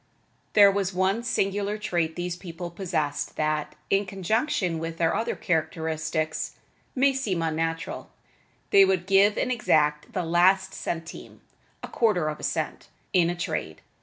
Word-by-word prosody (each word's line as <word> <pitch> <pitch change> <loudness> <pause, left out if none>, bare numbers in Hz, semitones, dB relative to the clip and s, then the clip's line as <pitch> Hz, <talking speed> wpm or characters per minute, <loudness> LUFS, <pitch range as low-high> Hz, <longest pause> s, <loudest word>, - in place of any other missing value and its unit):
There 200 -2 +8
was 195 -2 -1
one 190 +4 +1
singular 205 -3 -1
trait 170 -6 -1
these 175 0 -3
people 175 -1 -7
possessed 165 -5 -2
that, 155 -1 -1 0.2
in 195 0 +2
conjunction 195 - 0
with 165 0 -5
their 165 -1 +1
other 225 - -1
characteristics, 160 -2 -2 0.4
may 275 +1 +4
seem 205 -11 -1
unnatural: 165 0 -2 0.6
they 195 - +8
would 190 -2 +1
give 195 +2 +4
and - - 0
exact 150 -10 +1
the 185 - -1
last 185 +3 +3
centime 165 0 -6 0.4
(a - - -4
quarter 185 -9 +1
of 150 - -5
a - - -11
cent) - - -3 0.3
in 175 -2 +4
a 175 - -2
trade. 160 - -4
175 Hz, 145 wpm, -26 LUFS, 160-195 Hz, 0.6 s, There